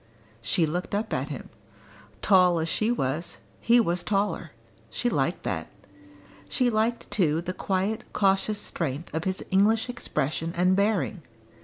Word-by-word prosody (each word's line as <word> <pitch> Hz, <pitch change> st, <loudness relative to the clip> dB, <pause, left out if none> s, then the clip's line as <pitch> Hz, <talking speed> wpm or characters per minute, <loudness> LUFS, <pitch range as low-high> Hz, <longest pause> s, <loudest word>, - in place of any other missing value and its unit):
She 170 Hz, -, +2 dB
looked 175 Hz, +5 st, -3 dB
up 215 Hz, +2 st, -2 dB
at 135 Hz, +3 st, -1 dB
him. 140 Hz, -, -7 dB, 0.7 s
Tall 180 Hz, -3 st, +5 dB
as 160 Hz, -, -1 dB
she 215 Hz, +6 st, +1 dB
was, 165 Hz, -, -2 dB, 0.2 s
he 240 Hz, +1 st, +5 dB
was 175 Hz, -5 st, +1 dB
taller 200 Hz, -4 st, 0 dB, 0.4 s
she 240 Hz, -, -1 dB
liked 135 Hz, -6 st, 0 dB
that; -, -, -2 dB, 0.8 s
she 250 Hz, -1 st, +2 dB
liked 225 Hz, +2 st, 0 dB
too 165 Hz, -6 st, +2 dB
the 180 Hz, +2 st, -4 dB
quiet 195 Hz, +5 st, -1 dB
cautious 195 Hz, +1 st, +2 dB
strength 155 Hz, 0 st, -4 dB
of 160 Hz, +1 st, -2 dB
his 190 Hz, 0 st, -2 dB
English 215 Hz, +5 st, +3 dB
expression 160 Hz, -, -2 dB
and 180 Hz, +2 st, +3 dB
bearing. 200 Hz, -2 st, +1 dB
185 Hz, 145 wpm, -27 LUFS, 165-215 Hz, 0.8 s, Tall